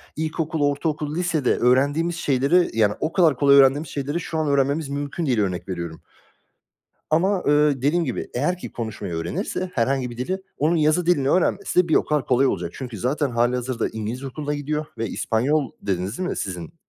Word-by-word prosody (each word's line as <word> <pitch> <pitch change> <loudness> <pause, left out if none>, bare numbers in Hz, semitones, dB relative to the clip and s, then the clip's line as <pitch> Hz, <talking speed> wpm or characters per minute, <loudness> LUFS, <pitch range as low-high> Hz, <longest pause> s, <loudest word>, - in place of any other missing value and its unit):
ilkokul, 160 0 -2
ortaokul, 150 +1 -3
lisede 165 -7 +1
öğrendiğimiz 145 +7 +2
şeyleri, 145 +3 +2
yani 105 -1 +4
o 155 - -2
kadar 160 -8 +4
kolay 140 -1 +5
öğrendiğimiz 140 +3 +4
şeyleri 145 +4 -3
şu 165 -1 -4
an 155 - 0
öğrenmemiz 140 +1 +1
mümkün 145 +4 -3
değil, 125 -6 +1
örnek 90 -2 -3
veriyorum. 85 -3 -5 1.1
Ama 185 +5 +2
eee, 145 -2 +3
dediğim 165 +5 +2
gibi, - - -3
eğer 150 +8 0
ki - - -8
konuşmayı 105 -5 -5
öğrenirse 85 - -3
herhangi 130 +1 0
bir 120 - -9
dili, 185 +10 -2 0.2
onun 155 +4 +2
yazı 155 +2 +2
dilini 140 -6 +2
öğrenmesi 185 +1 +1
de - - -8
bir 160 - +2
o - - +3
kadar 150 -2 0
kolay 130 +1 +3
olacak. 85 -7 -2
Çünkü 125 -4 -6
zaten 135 - 0
halihazırda 120 0 0
İngiliz 110 +4 -5
okuluna 145 +2 -4
gidiyor 150 +1 -2
ve 115 0 -2
İspanyol 130 +8 0
dediniz 95 +2 -2
değil 185 0 -2
mi - - -3
sizin? 90 -4 -5
140 Hz, 180 wpm, -23 LUFS, 120-155 Hz, 1.1 s, kolay